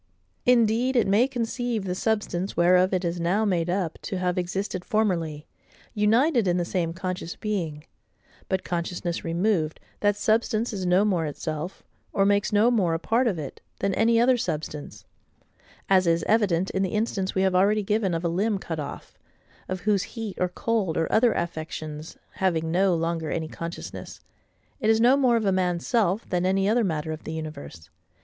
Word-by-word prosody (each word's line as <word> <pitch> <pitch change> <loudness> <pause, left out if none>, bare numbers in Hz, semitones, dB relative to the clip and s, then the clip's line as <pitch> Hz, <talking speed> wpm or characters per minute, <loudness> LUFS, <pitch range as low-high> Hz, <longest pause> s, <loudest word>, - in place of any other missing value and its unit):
Indeed 245 +1 +3
it 240 - +4
may 205 +6 +4
conceive 240 -3 -2
the 180 - -1
substance 195 -2 -1
whereof 180 +2 +4
it 185 -1 0
is 170 +1 -2
now 185 +6 +1
made 175 -4 0
up 180 -3 -1
to 195 - -4
have 180 -1 0
existed 185 +1 -3
formerly, 170 -10 -1 0.5
united 230 - +3
in 175 0 +2
the 175 - 0
same 170 -2 -1
conscious 185 0 -4
being: 170 -8 -3 0.7
but, 190 -1 0
consciousness 175 0 -3
removed, 170 -2 0 0.2
that 205 -1 +2
substance 220 +2 +1
is 190 -3 -3
no 185 +3 +4
more 175 -6 +1
itself, 155 +4 -5 0.3
or 195 - +3
makes 200 +1 +2
no 215 +3 +4
more 185 -8 +2
a - - -2
part 235 +8 +1
of 195 -6 0
it, 145 -4 -7 0.2
than 195 0 0
any 230 +3 +3
other 250 +1 +4
substance; 150 - -5 0.8
as 185 -2 +4
is 165 0 +2
evident 195 -5 +2
in 190 - -1
the 190 +1 -1
instance 205 -3 -1
we 190 - +2
have 190 -1 +2
already 205 +3 +3
given 200 -3 0
of 165 - -3
a - - +3
limb 200 +5 0
cut 165 -4 -5
off, 145 -1 -8 0.5
of 185 -1 -3
whose 205 -1 +2 0.2
heat, 220 -4 -4
or 180 - +2
cold, 205 -3 -1
or 165 - 0
other 230 +1 +4
affections, 155 -2 -5 0.2
having 165 -4 0
no 185 +1 +3
longer 165 -1 -2
any 160 +1 -2
consciousness, 165 +2 -7 0.6
it 215 - +1
is 220 0 +4
no 245 +4 +6
more 255 -4 +3
of 220 - -1
a 195 - +3
man's 180 -2 0
self 220 -3 +1
than 180 -1 +1
any 195 +1 +2
other 230 +3 +3
matter 160 -4 -2
of 155 0 -6
the 160 - -5
universe. 120 - -8
185 Hz, 185 wpm, -25 LUFS, 170-215 Hz, 0.8 s, no